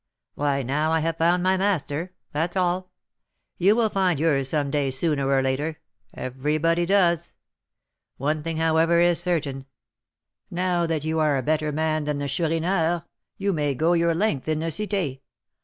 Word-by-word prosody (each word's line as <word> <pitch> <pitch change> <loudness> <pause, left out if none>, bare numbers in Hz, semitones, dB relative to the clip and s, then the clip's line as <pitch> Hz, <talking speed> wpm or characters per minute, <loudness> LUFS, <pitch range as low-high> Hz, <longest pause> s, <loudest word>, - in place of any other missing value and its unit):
"Why, 140 -1 0
now 150 +5 0
I 160 0 +2
have 165 +1 -1
found 175 +2 +2
my 190 +1 +3
master, 180 -3 -1 0.2
that's 165 +5 -2
all; 185 0 0 0.7
you 195 +4 +5
will 225 -2 +2
find 185 -6 +1
yours 140 -4 +1
some 145 -2 -1
day 145 -2 0
sooner 140 0 0
or 135 -1 +3
later, 145 +4 -2 0.3
everybody 155 +6 -1
does. 175 -4 +2 0.8
One 150 +3 -1
thing, 165 +1 -4
however, 165 +1 +3
is 175 0 +4
certain; 150 -7 -1 0.8
now 175 -1 0
that 160 -3 -1
you 160 +1 -1
are 150 -3 +2
a 130 - -2
better 155 +2 0
man 155 0 -1
than 150 -1 -1
the 145 0 -3
Chourineur, 165 +3 0 0.3
you 200 0 0
may 145 -4 0
'go 165 +6 +2
your 170 -1 +2
length' 170 -8 0
in 155 -1 +1
the 165 +1 -2
Cité. 190 -8 -1
160 Hz, 165 wpm, -24 LUFS, 145-175 Hz, 0.8 s, you